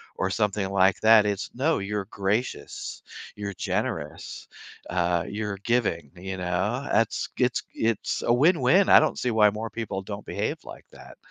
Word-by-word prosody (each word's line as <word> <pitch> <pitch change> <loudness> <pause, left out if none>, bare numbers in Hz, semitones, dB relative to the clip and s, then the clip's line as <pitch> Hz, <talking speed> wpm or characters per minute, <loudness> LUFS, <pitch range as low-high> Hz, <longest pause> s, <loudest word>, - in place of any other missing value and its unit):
or 95 - -1
something 100 -1 0
like 95 -1 +3
that, 110 -1 +7
it's, 100 0 -2
no, 155 +3 +1
you're 100 0 -3
gracious, 100 +4 -3 0.3
you're 100 -1 -5
generous, - - -4 0.4
uh, 85 -1 +1
you're 105 -1 -4
giving, 100 - 0
you 95 +1 -6
know? 95 +10 -1
That's 115 -1 +1
it's 125 -1 +1
it's 115 -2 -1
a - - +1
win-win. 160 +6 +4
I - - +9
don't 155 - 0
see 125 - 0
why 105 -1 +5
more 110 +2 -5
people 105 -4 -4
don't 100 +1 -7
behave - - -3
like - - -11
that. - - -14
105 Hz, 160 wpm, -26 LUFS, 95-115 Hz, 0.4 s, I